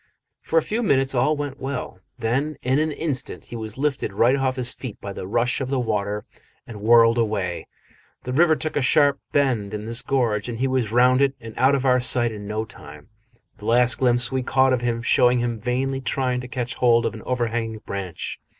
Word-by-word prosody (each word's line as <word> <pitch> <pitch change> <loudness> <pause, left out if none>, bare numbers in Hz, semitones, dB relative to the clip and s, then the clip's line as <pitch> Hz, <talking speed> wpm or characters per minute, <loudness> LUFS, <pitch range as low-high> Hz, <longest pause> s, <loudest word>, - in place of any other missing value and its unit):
For 165 - -1
a 160 - +4
few 220 +3 -2
minutes 135 - +2
all 140 +4 +2
went 145 -1 -5
well. 135 -8 -5 0.2
Then, 135 +6 -1
in 130 +3 +2
an 155 0 0
instant, 145 -3 -3
he - - -9
was 110 -1 -6
lifted 140 -6 -1
right 120 +6 +3
off 130 -1 0
his 125 -1 -2
feet 125 -6 -8
by 100 - -6
the 90 - -7
rush 120 +6 0
of 130 - -3
the 135 - 0
water 105 -4 -2 0.4
and 105 -3 -10
whirled 115 +1 +5
away. 100 -6 -2 0.6
The 125 - -4
river 160 +3 +4
took 155 0 -4
a 145 - +1
sharp 140 0 +3
bend 120 -8 0
in 105 0 -6
this 115 +1 -1
gorge, 120 -5 0
and 115 - -4
he 130 +3 0
was 130 -5 -1
round 125 +2 +4
it 140 0 +2
and 115 -1 -9
out 135 +2 +3
of 135 -1 -2
our 125 -1 +4
sight 120 -1 +2
in 105 -2 -8
no 110 +1 -2
time, 75 -7 -13 0.5
the 105 - -10
last 120 +2 +3
glimpse 120 -1 +2
we 130 0 0
caught 130 +1 +2
of 125 - 0
him 120 -1 -1
showing 125 0 +4
him 120 -2 -2
vainly 135 +3 -1
trying 125 -1 -1
to 125 - -8
catch 125 0 -4
hold 120 -2 +3
of - - -1
an 110 - -9
overhanging 115 -3 -2
branch. 95 -4 -5
125 Hz, 215 wpm, -23 LUFS, 115-135 Hz, 0.6 s, whirled